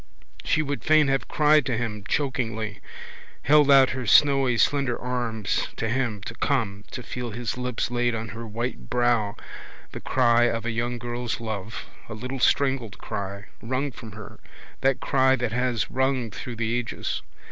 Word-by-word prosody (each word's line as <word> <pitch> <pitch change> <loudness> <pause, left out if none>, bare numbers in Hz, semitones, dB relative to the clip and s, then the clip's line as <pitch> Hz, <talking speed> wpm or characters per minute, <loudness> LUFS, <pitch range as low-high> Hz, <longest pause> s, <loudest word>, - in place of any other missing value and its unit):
She 155 - +2
would 145 -1 -3
fain 155 -2 +5
have 135 0 0
cried 150 0 +4
to 120 -4 0
him 110 -3 -3
chokingly, 115 -7 -2 0.6
held 150 0 +5
out 135 -2 +7
her 125 -2 -4
snowy 135 0 +5
slender 135 -1 +2
arms 120 -4 -1
to 115 - -2
him 115 -4 -1
to 115 - -6
come, 110 -6 -1
to 125 - -7
feel 125 0 -5
his 115 +2 -3
lips 125 -1 -2
laid 120 -1 +1
on 110 0 -4
her 115 +3 -7
white 110 - -4
brow, 120 -4 +1 0.6
the - - -6
cry 120 -2 +3
of 115 -1 -1
a 120 - 0
young 120 +1 -2
girl's 120 0 -3
love, 110 -2 -5 0.2
a 110 - -5
little 130 +4 -5
strangled 130 -5 +1
cry, 100 0 -5 0.2
wrung 130 +5 -2
from 110 -3 -10
her, 105 -1 -10 0.4
that 135 0 +2
cry 130 -1 +3
that 125 -3 -2
has 125 -1 0
rung 130 -3 0
through 120 +4 -7
the 115 +1 -1
ages. 120 - -4
120 Hz, 170 wpm, -25 LUFS, 115-130 Hz, 0.6 s, out